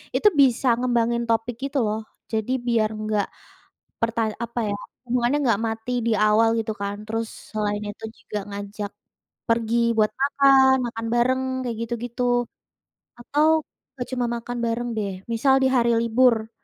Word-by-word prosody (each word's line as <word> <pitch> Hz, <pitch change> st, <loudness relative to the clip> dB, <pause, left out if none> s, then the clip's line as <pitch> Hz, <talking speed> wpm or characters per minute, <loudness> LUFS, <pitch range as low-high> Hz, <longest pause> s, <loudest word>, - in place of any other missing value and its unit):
itu 420 Hz, -, +4 dB
bisa 260 Hz, 0 st, +3 dB
ngembangin 235 Hz, -1 st, +1 dB
topik 225 Hz, +1 st, 0 dB
gitu 275 Hz, -, -1 dB
loh. 215 Hz, +1 st, -1 dB, 0.3 s
Jadi 220 Hz, +3 st, -1 dB, 0.2 s
biar 225 Hz, -2 st, +2 dB
enggak 215 Hz, -1 st, -1 dB, 0.7 s
perta 230 Hz, -1 st, 0 dB
apa 235 Hz, 0 st, -3 dB
ya, -, -, -1 dB, 0.3 s
hubungannya 245 Hz, +3 st, +1 dB
enggak 225 Hz, -2 st, +2 dB
mati 225 Hz, +3 st, -4 dB
di 230 Hz, -, +2 dB
awal 215 Hz, +2 st, +4 dB
gitu 220 Hz, -1 st, -2 dB
kan, 200 Hz, +1 st, -5 dB
terus 225 Hz, 0 st, -2 dB, 0.2 s
selain 210 Hz, -1 st, -2 dB
itu 210 Hz, +2 st, -7 dB
juga 210 Hz, -, -5 dB
ngajak 205 Hz, +1 st, -5 dB, 0.6 s
pergi 230 Hz, 0 st, +2 dB
buat 215 Hz, -1 st, +3 dB
makan, 270 Hz, -1 st, +5 dB
makan 225 Hz, -1 st, -5 dB
bareng 255 Hz, +2 st, +2 dB, 0.2 s
kayak 230 Hz, -2 st, -3 dB
gitu-gitu, 245 Hz, +1 st, -1 dB, 0.7 s
atau 310 Hz, +5 st, +2 dB, 0.4 s
enggak 245 Hz, -, -4 dB
cuma 250 Hz, -1 st, 0 dB
makan 240 Hz, +1 st, -4 dB
bareng 240 Hz, +1 st, -1 dB
deh, 200 Hz, -2 st, -2 dB, 0.2 s
misal 265 Hz, +4 st, +3 dB
di -, -, +5 dB
hari 235 Hz, -2 st, +3 dB
libur. 230 Hz, -1 st, +3 dB
230 Hz, 150 wpm, -24 LUFS, 220-245 Hz, 0.7 s, makan